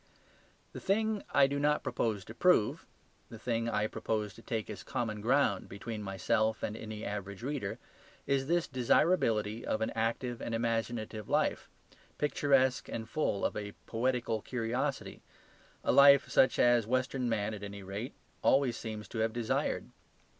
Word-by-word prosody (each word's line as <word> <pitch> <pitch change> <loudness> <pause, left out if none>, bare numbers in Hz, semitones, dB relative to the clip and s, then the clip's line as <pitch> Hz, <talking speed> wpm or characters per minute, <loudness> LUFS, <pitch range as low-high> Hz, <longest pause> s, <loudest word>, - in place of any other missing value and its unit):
The - - -6
thing 215 +1 +1
I 140 - +5
do 140 +1 -1
not 150 +1 +2
propose 105 -4 -1
to 110 - -9
prove, 180 -6 +2 0.4
the 115 - -9
thing 115 +1 -1
I 105 -2 +1
propose 105 -1 -2
to 115 - -14
take 110 -2 -3
as 105 - -7
common 110 -3 -3
ground 120 -4 +2
between 105 +2 -6
myself 110 +3 0
and 105 - -2
any 110 -1 -6
average 100 +1 -5
reader, 135 -7 -3 0.5
is 135 -1 +1
this 170 +1 +1
desirability 115 - +2
of 110 - -1
an 110 - -1
active 115 +2 -2
and 115 - -2
imaginative 115 -2 -2
life, - - +1 0.5
picturesque 135 -4 +2
and 110 -1 -4
full 115 -6 -1
of - - -1
a 105 -1 -5
poetical 120 -2 -1
curiosity, 125 +4 -3 0.6
a - - +2
life 140 0 +7
such 130 - +4
as 120 -3 +4
western 130 0 0
man 110 -1 -1
at 105 - -7
any 100 -1 -7
rate 100 +6 -5 0.3
always 135 -4 +3
seems 110 -2 -6
to 115 - -5
have 110 0 +1
desired. 120 -2 -1
115 Hz, 155 wpm, -32 LUFS, 110-130 Hz, 0.6 s, life